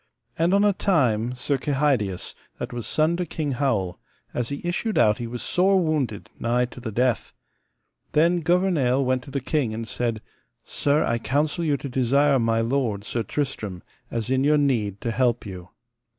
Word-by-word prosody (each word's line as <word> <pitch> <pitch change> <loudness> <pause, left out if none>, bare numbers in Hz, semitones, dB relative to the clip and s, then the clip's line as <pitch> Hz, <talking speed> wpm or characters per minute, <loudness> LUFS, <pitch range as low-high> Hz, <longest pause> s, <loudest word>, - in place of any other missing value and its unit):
And 165 +2 +2
on 200 - +4
a 205 - +4
time 125 - +1
Sir 135 +2 -1
Kehydius, 135 - 0 0.2
that - - -5
was 120 -3 -4
son 155 +2 +2
to 180 - -1
King 150 -2 -2
Howel, 115 -10 0 0.3
as 120 -1 -2
he 140 - -4
issued 215 +5 -1
out 105 -1 +4
he 120 - -3
was 120 +1 -5
sore 190 +2 +3
wounded, 145 - -1
nigh 120 +1 +1
to - - -10
the 115 -2 -5
death. 125 +2 0 0.8
Then 170 +3 +4
Gouvernail 160 -7 +2
went 130 0 +1
to - - -10
the 140 +1 -2
king 130 -4 -1
and 115 0 -5
said: 115 0 -2 0.4
Sir, 145 +2 +1
I 115 - 0
counsel 150 +7 0
you 150 -3 +1
to 140 - -6
desire 135 +2 +3
my 115 -1 +2
lord, 115 -4 0
Sir 115 +2 -2
Tristram, 110 -7 -3 0.3
as 115 +1 -3
in 130 0 +2
your 150 +1 +4
need 115 -9 +1
to 115 - -1
help 120 0 +1
you. 90 -2 -8
130 Hz, 180 wpm, -24 LUFS, 115-150 Hz, 0.8 s, on